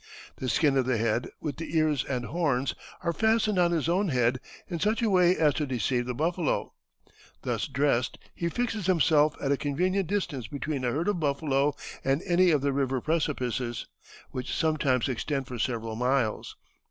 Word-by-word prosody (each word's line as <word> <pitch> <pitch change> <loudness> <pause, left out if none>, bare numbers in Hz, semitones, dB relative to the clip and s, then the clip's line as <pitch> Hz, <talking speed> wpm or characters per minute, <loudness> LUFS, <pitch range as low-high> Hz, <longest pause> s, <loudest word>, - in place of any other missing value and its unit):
The 130 - -3
skin 145 +2 +3
of 130 -1 +1
the 130 -3 +2
head, 115 +2 0
with 145 -4 -4
the 165 0 -3
ears 155 -4 +2
and 125 -2 -3
horns, 140 -5 0 0.3
are 170 - 0
fastened 220 -1 +2
on 175 -1 +4
his 165 -3 0
own 185 +4 +2
head 125 -3 +2 0.3
in 170 -3 -4
such 215 +6 +1
a 220 - +2
way 180 -1 +5
as 150 -3 +4
to 145 +3 -2
deceive 125 0 0
the 125 - -3
buffalo. 165 +3 -1 0.7
Thus - - -1
dressed 140 -4 +1 0.2
he 170 - -2
fixes 225 -2 -2
himself 155 -4 +4
at 140 - -1
a 140 - +3
convenient 180 +7 0
distance 160 - -2
between 140 +2 -3
a 120 - +1
herd 160 +9 -1
of 205 -4 +1
buffalo 140 -1 +1 0.3
and 135 +4 +1
any 180 0 +4
of 150 -4 +3
the 140 0 +1
river 135 -1 0
precipices, 130 -6 -1 0.5
which 130 0 -4
sometimes 145 -6 +1
extend 135 +2 -2
for 125 -2 -7
several 115 -2 -2
miles. 125 -1 0
145 Hz, 180 wpm, -28 LUFS, 130-170 Hz, 0.7 s, way